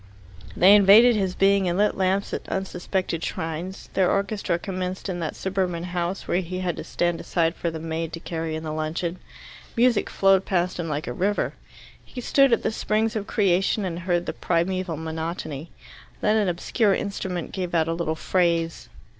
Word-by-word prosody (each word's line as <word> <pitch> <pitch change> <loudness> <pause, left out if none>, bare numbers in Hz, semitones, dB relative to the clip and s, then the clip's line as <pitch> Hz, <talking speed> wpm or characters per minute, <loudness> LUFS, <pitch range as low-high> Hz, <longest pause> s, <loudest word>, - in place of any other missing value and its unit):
They 190 +3 +7
invaded 210 +4 +7
his 190 -3 -1
being 195 -1 +3
and 175 - -1
lit 210 +1 +2
lamps 195 +1 0
at - - -5
unsuspected 185 -2 -2
shrines. 165 +4 -5
Their 185 -2 +3
orchestra 200 -3 0
commenced 185 0 -4
in 175 -2 -3
that 160 -3 -3
suburban 185 -3 -2
house, 180 +1 -3
where 180 - +1
he 185 +1 -5
had 180 -2 -1
to - - -5
stand 175 -1 -1
aside 165 -2 0
for 170 - -2
the 160 -1 -6
maid 160 0 -3
to 165 - -5
carry 165 -1 -4
in 160 - -5
the 155 -1 -4
luncheon. 165 +3 -3 0.6
Music 240 -2 +3
flowed 195 -1 +4
past 180 -1 -1
him 165 -2 -3
like 150 0 -2
a 120 - -4
river. 200 +9 0 0.5
He 255 - -9
stood 275 +2 +4
at 230 - +2
the - - +1
springs 220 +1 0
of 210 -1 -3
creation 195 +1 +2
and 170 -2 -3
heard 175 -1 0
the - - -3
primeval 180 0 -1
monotony. 160 -1 -5 0.5
Then 210 - +2
an 210 -3 +2
obscure 195 +4 +1
instrument 185 -4 -4
gave 180 -3 -3
out 160 -1 +2
a 165 - 0
little 165 -1 -2
phrase. 170 -1 0
180 Hz, 185 wpm, -24 LUFS, 165-195 Hz, 0.6 s, They